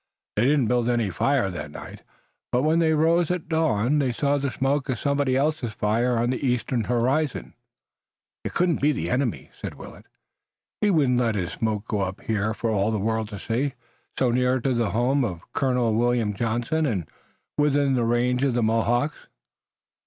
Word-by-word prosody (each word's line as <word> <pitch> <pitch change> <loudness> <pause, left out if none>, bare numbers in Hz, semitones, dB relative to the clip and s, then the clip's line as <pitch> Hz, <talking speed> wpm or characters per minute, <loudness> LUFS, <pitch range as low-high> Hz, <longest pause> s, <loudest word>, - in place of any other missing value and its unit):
They 110 - +2
did 145 +1 +3
not 120 - +1
build 120 0 +1
any 115 -5 +1
fire 110 +3 +1
that 75 -4 -6
night, - - -10 0.5
but 125 +2 +1
when 160 +2 +3
they 160 -1 +3
rose 165 +2 +3
at 180 -2 -2
dawn 150 -4 +1
they 135 -3 +1
saw 140 +4 0
the 140 0 -1
smoke 135 +3 -1
of 130 - 0
somebody 140 0 0
else's 140 -5 0
fire 115 +4 +1
on 120 +2 +1
the 130 - -3
eastern 125 -2 0
horizon. 125 - 0 0.9
"It - - -5
couldn't 175 -3 +1
be 150 +2 +3
the 85 - -3
enemy," 125 - -1
said - - -5
Willet. - - -12 0.7
"He 210 - +3
wouldn't 140 -9 +3
let 115 -3 +1
his 90 -2 -2
smoke 110 -2 -2
go 105 -2 -1
up 95 0 -3
here 110 0 -1
for 115 0 -1
all 100 0 +1
the 110 - 0
world 110 +1 -1
to 105 - -7
see, 125 +7 -2 0.4
so 125 -2 +2
near 125 +1 +2
to 130 +2 0
the 120 -3 0
home 130 +5 +1
of 90 -7 -5
Colonel 125 -4 +1
William 120 -2 +1
Johnson 120 +9 -1
and 95 - -2 0.5
within 145 -2 +2
the 125 -2 +1
range 125 +2 +1
of 135 -4 +1
the 120 - +1
Mohawks." 120 +6 0
125 Hz, 190 wpm, -24 LUFS, 110-140 Hz, 0.9 s, did